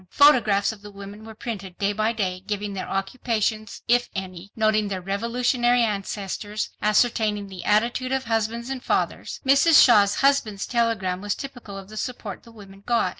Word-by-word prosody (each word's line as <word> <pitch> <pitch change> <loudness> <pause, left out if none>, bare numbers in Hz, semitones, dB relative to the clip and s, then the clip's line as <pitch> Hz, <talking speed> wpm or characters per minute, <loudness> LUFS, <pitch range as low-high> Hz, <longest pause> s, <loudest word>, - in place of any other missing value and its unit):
Photographs 230 -9 +4
of 215 -2 -12
the 205 - -10
women 200 +1 -10
were 220 0 -10
printed 200 -6 -7
day 200 +1 0
by 215 +2 +1
day—giving 200 0 -3
their 190 - -5
occupations, 215 +1 -2
if 245 +1 +3
any, 190 0 -6
noting 215 -1 +2
their 195 -2 -3
revolutionary 240 +5 +1
ancestors, 205 0 -3
ascertaining 210 -1 +1
the 185 -2 -8
attitude 235 +5 +1
of 265 0 0
husbands 230 +2 -2
and 260 -2 -5
fathers. - - -2
Mrs. 280 +4 +6
Shaw's 205 -5 +5
husband's 265 -8 +1
telegram 220 -7 0
was 205 0 -2
typical 245 -7 -8
of 195 -1 -9
the 215 +1 -11
support 250 +3 -5
the 230 - -16
women 195 -3 -14
got. 235 -5 +1
215 Hz, 165 wpm, -24 LUFS, 200-235 Hz, -, Mrs